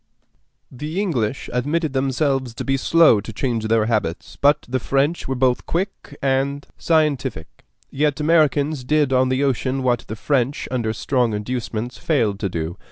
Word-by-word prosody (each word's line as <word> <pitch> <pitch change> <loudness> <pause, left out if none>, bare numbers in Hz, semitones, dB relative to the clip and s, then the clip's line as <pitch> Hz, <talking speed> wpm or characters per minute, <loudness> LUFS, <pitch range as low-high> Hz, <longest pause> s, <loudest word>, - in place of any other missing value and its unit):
The 150 +8 -4
English 135 - -1
admitted 145 +4 0
themselves 135 -2 0
to - - -4
be 135 - +1
slow 145 -5 +4
to 115 - -8
change 115 0 -2
their 110 -1 +2
habits, 105 -7 -2
but 145 +1 +2
the 130 +1 -1
French 140 +7 0
were 135 - -1
both 125 -1 +1
quick 175 -5 -3
and 140 +1 0
scientific; 140 - -1 0.3
yet 145 0 0
Americans 150 -2 +2
did 145 0 +2
on 130 0 +3
the 130 +2 +1
ocean 135 0 0
what 120 -2 +1
the 110 - -5
French, 135 +3 0
under 120 -4 -1
stronger 120 -1 0
inducements, 120 +1 -4
failed 110 -11 0
to 100 - -1
do. 85 +1 -4
130 Hz, 160 wpm, -21 LUFS, 115-145 Hz, 0.3 s, slow